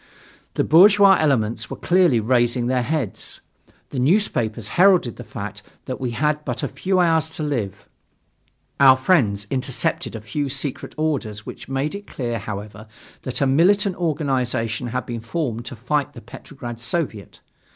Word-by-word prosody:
The - - +2
bourgeois 195 +4 +7
elements 120 -8 0
were - - -6
clearly 175 -9 +3
raising 120 +1 +2
their 125 0 +1
heads. 130 -6 -3 0.5
The 130 - -3
newspapers 120 - +1
heralded 180 -8 +4
the 120 - -8
fact 105 -1 -7 0.2
that 130 0 -5
we 125 - -1
had 150 +5 0
but 125 -4 -4
a - - +1
few 185 0 -1
hours 160 -2 +3
more - - -10
to 155 - -3
live. 100 -6 -5 0.9
Our 135 -1 +7
friends 125 - +2
intercepted 135 -3 -1
a 110 - -6
few 135 +7 -3
secret 140 0 -4
orders 120 -9 -2
which - - -9
made 135 +3 -1
it 200 0 -8
clear, 120 -3 -3
however, 105 +2 -7 0.3
that 130 - -4
a - - +4
militant 185 +8 +3
organization 130 -8 -1
had 125 +2 -3
been 120 -2 -5
formed 120 -2 -3
to 130 - -7
fight 135 +5 -1
the 115 - -11
Petrograd 120 0 -9
Soviet. 115 -3 -4
130 Hz, 160 wpm, -22 LUFS, 115-155 Hz, 0.9 s, bourgeois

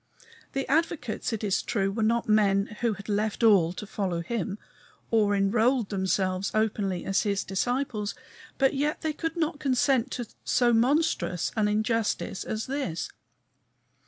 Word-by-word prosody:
The 270 -1 -2
advocates, 300 -6 0
it 225 -1 -3
is 200 -3 +1
true, 195 -3 0
were 220 +3 -3
not 230 +2 +1
men 205 -1 +2
who 235 -2 +2
had 200 0 -10
left 210 +2 -1
all 195 -7 +5
to 210 - -7
follow 190 -5 -2
him, 210 +2 -3 0.5
or 210 -3 +3
enrolled 220 +4 +2
themselves 190 -1 0
openly 205 -4 0
as 195 0 +2
his 200 -2 0
disciples, 230 +1 -1 0.4
but 270 -1 +3
yet 295 +2 -1
they 315 -1 -1
could 325 +2 -4
not 315 -2 -1
consent 265 -2 +2
to 245 - -3 0.2
so 240 -1 +3
monstrous 230 - +1
an 215 -2 +2
injustice 215 -2 0
as 220 0 -3
this. 260 - -3
220 Hz, 150 wpm, -27 LUFS, 195-255 Hz, 0.5 s, all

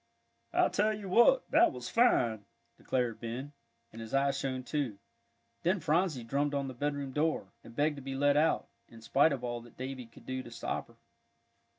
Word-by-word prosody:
"I - - +4
tell 215 +1 +2
you 205 -2 -7
what, 240 - +5
that - - +6
was - - -7
fine!" 120 - +3 0.3
declared 125 -3 -1
Ben, 125 +5 -5 0.4
and 115 - -8
his 115 +3 -4
eyes 140 0 +2
shone 130 -2 -2
too. 130 -7 -2 0.6
Then 185 +4 +2
Phronsie 155 -4 +1
drummed 140 +5 0
on 140 -1 -1
the 130 - -5
bedroom 145 +1 -2
door, 155 +3 0
and 115 - -13
begged 150 +2 +1
to - - -7
be 135 0 -5
let 145 +1 +3
out, 155 +2 +2 0.2
in 115 -1 -14
spite 140 +7 +4
of 135 -3 -3
all 120 -1 -3
that 120 0 -16
Davie 130 -1 -5
could 115 - -17
do 130 0 -3
to - - -10
stop - - -4
her. - - -20
135 Hz, 195 wpm, -32 LUFS, 120-150 Hz, 0.6 s, that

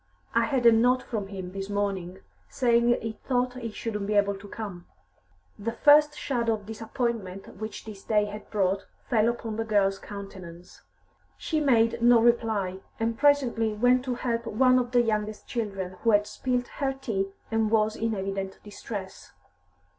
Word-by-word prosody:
"I 230 0 +3
had 250 0 0
a 235 - +9
note 245 +3 +3
from 210 -4 -4
him 190 -2 -7
this 195 +1 -5
morning, 195 -3 -2 0.3
saying 235 -2 +2 0.2
he 225 - -2
thought 250 -1 0
he 245 -2 -5
shouldn't 210 -2 -4
be 210 - 0
able 200 0 +3
to 200 +1 -10
come." 195 -5 -7 0.7
The 225 +3 -2
first 295 +2 +5
shadow 235 -4 0
of 210 -2 -11
disappointment 225 -4 -4
which 215 +2 -6
this 210 -3 -9
day 210 -2 +2
had 210 +1 -8
brought 195 -1 0 0.2
fell 225 -1 +4
upon 225 -2 -4
the 225 - 0
girl's 200 -3 +2
countenance. 185 -3 -10 0.6
She 315 - -1
made 230 -6 +3
no 240 0 +6
reply, 220 -5 +1 0.2
and 225 0 0
presently 260 -5 +2
went 250 +4 +3
to 250 -2 -1
help 235 -2 -2
one 255 +3 +4
or 250 - 0
the 245 0 +2
youngest 215 -1 -2
children, 195 -6 -4
who 230 - +2
had 205 -1 +4
spilt 250 +2 -2
her 275 -2 +1
tea 225 -8 -2 0.2
and 225 -1 +1
was 215 0 +2
in 225 0 -1
evident 195 0 -4
distress. 205 - -8
220 Hz, 170 wpm, -27 LUFS, 200-240 Hz, 0.7 s, a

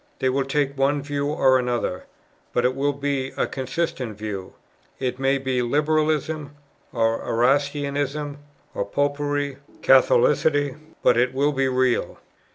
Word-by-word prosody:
They 130 - +1
will 135 +1 0
take 140 0 0
one 140 +1 +1
view 145 0 -2
or 130 -3 +3
another, 120 -7 -2 0.5
but 120 - +1
it 125 - +2
will 140 +1 +1
be 140 -1 -2
a - - +2
consistent 130 -4 -3
view. 105 -3 -6 0.4
It 130 -1 -3
may 135 +1 +2
be 130 -2 -1
Liberalism, 150 +2 0 0.4
or 115 -1 +1
Erastianism, 140 +3 0 0.3
or - - -1
Popery, 145 +4 -1
or - - -24 0.2
Catholicity; 310 - +4 0.3
but - - +4
it 125 +2 +2
will 145 +2 +2
be 135 -1 +1
real." 130 -1 +1
140 Hz, 140 wpm, -23 LUFS, 130-145 Hz, 0.5 s, Catholicity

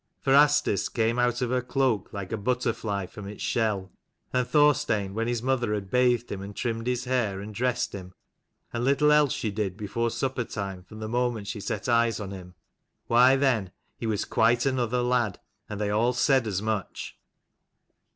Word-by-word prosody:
For 135 - +1
Asdis 145 -8 +4
came 115 0 0
out 125 +1 +1
of 125 - -1
her 125 0 +1
cloak 125 -5 0
like 100 -3 -6
a - - 0
butterfly 115 -3 -1
from 100 +2 -10
its 105 0 -7
shell; 105 -5 0 0.4
and 125 -1 +1
Thorstein, 145 -10 +2
when 115 +2 -1
his 120 -1 -1
mother 125 -5 +1
had 100 -2 -6
bathed 125 -1 +2
him 95 - -4
and 100 +1 -8
trimmed 115 -1 -3
his 125 -1 0
hair 125 -7 0
and 105 +2 -7
dressed 125 +3 -1
him 95 -1 -8 0.6
and 120 0 -2
little 140 +3 +3
else 150 -2 +4
she 110 - -2
did 100 -2 -3
before 115 +2 -1
supper 130 +1 -2
time 100 -4 -5
from 110 +4 -12
the 110 - -3
moment 120 -2 -1
she 105 +1 -5
set - - -4
eyes 115 -1 +2
on 100 -2 -5
him 90 -2 -10 0.5
why 125 +3 +5
then 130 -8 +1 0.3
he 115 - -5
was 105 -2 -1
quite 120 +2 +2
another 125 -2 0
lad, 120 -5 0 0.3
and 105 - -5
they 105 -1 0
all 115 +4 +2
said 130 -1 +2
as 100 -1 -2
much. 110 -3 -3
115 Hz, 190 wpm, -27 LUFS, 105-125 Hz, 0.6 s, why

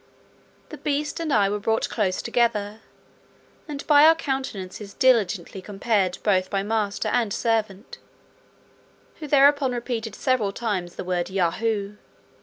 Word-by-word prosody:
The - - -9
beast 295 +2 -2
and 325 -2 -2
I 205 -5 +4
were 205 +1 -2
brought 220 +2 0
close 190 -5 -1
together, 225 -3 0 0.9
and 285 -2 -6
by 295 -1 +6
our 320 +1 +7
countenances 210 - -5
diligently 205 -7 +1
compared 195 -2 -1
both 185 -3 +2
by 195 -1 -1
master 210 -1 -1
and 235 -4 0
servant, 215 -2 -2 1.2
who 305 - -6
thereupon 280 -1 +4
repeated 235 -3 -4
several 240 -7 0
times 195 -7 -3
the - - -5
word 180 -1 -2
Yahoo. 200 +3 -1
220 Hz, 130 wpm, -24 LUFS, 195-255 Hz, 1.2 s, our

